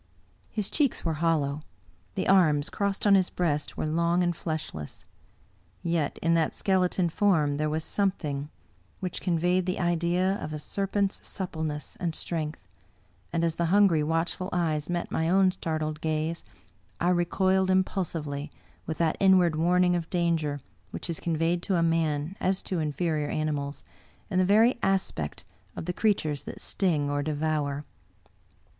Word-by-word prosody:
His 210 -2 -3
cheeks 280 - +1
were 165 - +1
hollow; 155 -3 +1 0.5
the - - -1
arms, 155 -7 +4
crossed 200 0 -1
on 205 - +6
his 190 -2 +4
breast, 150 -4 -1
were - - -1
long 170 +3 +2
and 175 -1 0
fleshless. 155 - -5 0.8
Yet 165 -4 0
in 165 +1 +3
that 165 -2 +1
skeleton 185 -2 +1
form 160 -5 +2
there 155 0 0
was 155 +1 -1
a - - 0
something 150 -8 0 0.5
which 185 -1 -4
conveyed 180 +1 +1
the 185 - -1
idea 175 +2 +1
of 155 - -5
a - - -3
serpent's 195 +5 -1
supple 180 -4 -4
ness 150 -1 -4
and 170 -3 -2
strength; 155 - -4 0.6
and 170 0 0
as 165 -1 0
the 170 - +1
hungry, 190 -3 +4
watchful 165 +4 -1
eyes 160 -4 0
met 175 -1 -2
my 160 +1 0
own 190 +1 +4
startled 155 -3 -3
gaze, 160 +1 -1 0.6
I 175 - +2
recoiled 185 +2 +2
impulsively 165 -6 -1 0.4
with 160 - -3
that 165 -2 +1
in 190 -1 +6
ward 175 -3 +3
warning 180 +2 +3
of 170 -2 -3
danger 165 -5 0 0.3
which 170 - -5
is 165 - -5
conveyed 165 +1 0
to 180 -1 0
man, 165 0 0
as 190 +1 0
to 185 - -2
inferior 155 -1 -1
animals, 145 -2 -2 0.5
in 185 - +2
the 185 - +4
very 225 +6 +4
aspect 190 - -1 0.3
of - - -5
the 180 - -2
creatures 165 -9 +1
that - - -7
sting 160 -7 0
or 145 0 0
devour. 150 -1 -1
170 Hz, 155 wpm, -27 LUFS, 155-185 Hz, 0.8 s, on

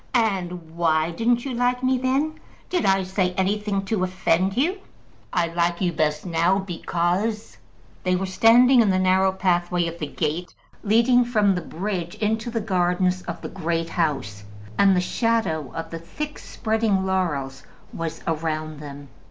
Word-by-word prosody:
"And 180 -7 -1
why 160 -1 +2
didn't 235 +6 +1
you 270 - -3
like 245 +1 0
me 260 0 +2
then? 275 +5 0 0.3
Did 355 - +1
I 195 0 +3
say 185 -1 -1
anything 200 +1 -1
to 195 -1 -1
offend 185 +1 +1
you?" 350 +9 +1 0.5
"I 175 - +2
like 170 0 0
you 180 -3 0
best 150 0 0
now, 170 +2 +2
because 190 +3 -2 0.2
" - - -29
They 185 0 +2
were 190 +1 -1
standing 240 +6 +6
in 215 - +3
the 185 - +2
narrow 185 +1 +3
pathway 175 -2 +1
of 165 0 -5
the 150 - -3
gate 160 +5 -3 0.3
leading 235 +4 +4
from 215 -5 +2
the 180 - -2
bridge 175 -1 -4
into 220 +2 -1
the 230 -1 -2
gardens 180 -2 +1
of - - -5
the - - -4
Great 165 -2 -2
House, 135 - -2 0.3
and 195 - +5
the 180 - +2
shadow 180 - 0
of 165 0 -5
the 165 - -5
thick 295 - -6
spreading 220 -4 0
laurels 150 -8 -1 0.3
was 165 -1 -5
around 155 -1 -2
them. 145 -1 -9
185 Hz, 165 wpm, -23 LUFS, 165-220 Hz, 0.5 s, standing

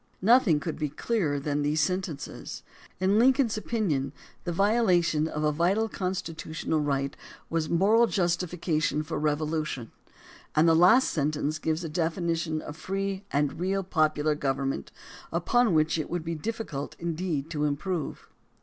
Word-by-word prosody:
Nothing 215 -8 +5
could 160 +1 -5
be 150 -2 -1
clearer 150 -2 -1
than 145 +1 -1
these 150 +2 +1
sentences. 165 -2 -3 0.4
In 195 +3 +3
Lincoln's 255 -1 +4
opinion 175 - -1 0.3
the 175 - -1
violation 180 -5 +2
of 155 -1 -3
a 150 - +3
vital 185 +8 +1
constitutional 165 -5 -3
right 140 -2 -1 0.4
was 165 -2 0
moral 215 +7 +4
justification 175 -5 0
for 160 +1 -4
revolution, 150 -4 -1 0.6
and 155 +2 +5
the 165 - +6
last 185 +11 +6
sentence 150 0 -1
gives 160 +2 -1
a - - -3
definition 165 -1 -1
of 150 - -7
free 195 +3 -3
and 145 +1 0
real 195 +2 0
popular 155 -4 +1
government 135 - -2 0.4
upon 225 +7 +2
which 155 +1 +2
it 155 - -3
would 175 -2 -2
be 165 - -2
difficult 165 -5 -4
indeed 165 -3 -2
to 150 -2 0
improve. 155 +3 -3
165 Hz, 140 wpm, -27 LUFS, 150-190 Hz, 0.6 s, the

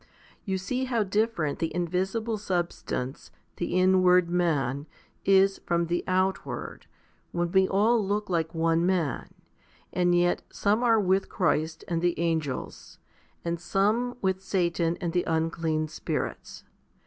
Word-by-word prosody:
You 190 -2 -1
see 250 +8 -2
how 235 -4 +1
different 205 -6 0
the 165 - -1
invisible 190 +6 -1
substance, 175 -8 -3 0.3
the 175 - -2
inward 185 -1 +4
man, 145 -5 0 0.4
is 195 0 +4
from 170 0 +1
the 175 +1 -1
outward, 185 +1 -2 0.4
when 175 0 -1
we 190 0 +4
all 215 +4 +3
look 205 +2 -1
like 165 -2 -1
one 165 0 +2
man, 175 -6 0 0.6
and 175 -1 +2
yet 175 0 +2
some 210 +3 +1
are 230 -2 +4
with 190 -1 +1
Christ 160 -3 0
and 165 -1 -1
the 175 -1 0
angels, 160 -5 -3 0.5
and 170 0 -1
some 215 +7 +1
with 190 0 0
Satan 175 -3 0
and 170 -4 -3
the 180 - +2
unclean 160 -1 0
spirits. 155 - -4
180 Hz, 135 wpm, -27 LUFS, 165-195 Hz, 0.6 s, inward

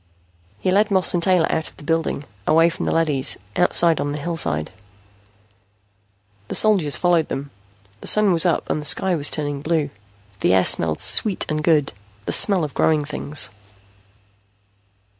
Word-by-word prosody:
He 185 - -1
led 205 +3 +2
Moss 190 -2 +2
and 175 - 0
Taylor 180 -2 +3
out 160 - -2
of - - -25
the - - -14
building, 165 -2 -2 0.2
away 165 +2 +3
from - - -5
the - - 0
leadys, 150 -5 +1 0.2
outside 170 -2 +2
on 145 0 -3
the - - -5
hillside. 145 - -4 1.8
The - - -5
soldiers 190 -10 +2
followed 175 -3 +1
them. 140 +1 -6 0.5
The - - -11
Sun 210 -3 +3
was 165 - +4
up 175 -3 -1
and 155 - -2
the - - -10
sky 185 +4 +1
was 145 -3 -3
turning 145 -2 -3
blue. 155 -2 -2 0.5
The 95 - +2
air 95 - +2
smelled 80 -2 +2
sweet 205 -4 +4
and 155 0 -2
good, 150 -4 +1 0.3
the - - -3
smell 195 -5 +3
of 150 - -5
growing 155 -2 +1
things. 145 -7 -1
160 Hz, 165 wpm, -20 LUFS, 145-175 Hz, 1.8 s, was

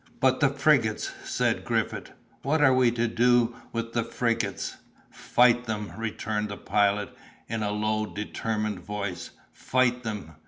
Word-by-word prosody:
"But 130 -1 +3
the 145 - +4
frigates?" 135 -6 +2
said - - 0
Griffith, - - -1 0.3
"what 150 +4 +1
are 135 -2 +6
we 130 -1 +4
to 120 0 0
do 120 0 +3 0.2
with 115 0 -4
the 115 - +1
frigates?" 115 -4 -2 0.3
"Fight 120 0 +3
them!" 105 -3 -4
returned 110 -1 -3
the 100 - -5
Pilot, 105 0 +1 0.3
in 115 0 -3
a 105 - 0
low, 110 +1 0
determined 105 -1 -3
voice; 100 -2 -5 0.2
"fight 125 -1 +1
them! 105 -9 -5
115 Hz, 145 wpm, -27 LUFS, 105-120 Hz, 0.3 s, are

